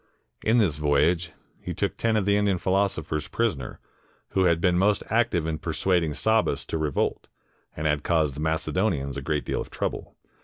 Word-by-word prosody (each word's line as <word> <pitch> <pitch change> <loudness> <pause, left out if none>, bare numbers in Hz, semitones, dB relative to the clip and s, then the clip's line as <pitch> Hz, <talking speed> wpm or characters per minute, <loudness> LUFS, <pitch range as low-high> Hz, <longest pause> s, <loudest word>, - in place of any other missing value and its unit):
In 110 +3 +3
this 95 -10 +2
voyage, 75 +4 +2 0.3
he - - -5
took - - -1
ten 115 -1 +1
of 105 - 0
the 100 0 +3
Indian 100 -2 +2
philosophers 95 -5 0
prisoners, 90 - -2 0.5
who 95 -1 +2
had 85 -2 +3
been 90 +1 +2
most 100 +3 +2
active 110 -8 +2
in 80 -1 -2
persuading 80 -1 0
Sabbas 110 0 +1
to 80 - -2
revolt, 75 -3 -1 0.5
and 80 - -3
had 75 -1 +1
caused 80 -3 +1
the 70 - -8
Macedonians 80 -2 0
a 70 - -4
great 75 +1 -2
deal - - -2
of - - -7
trouble. - - -4
85 Hz, 180 wpm, -26 LUFS, 75-100 Hz, 0.5 s, In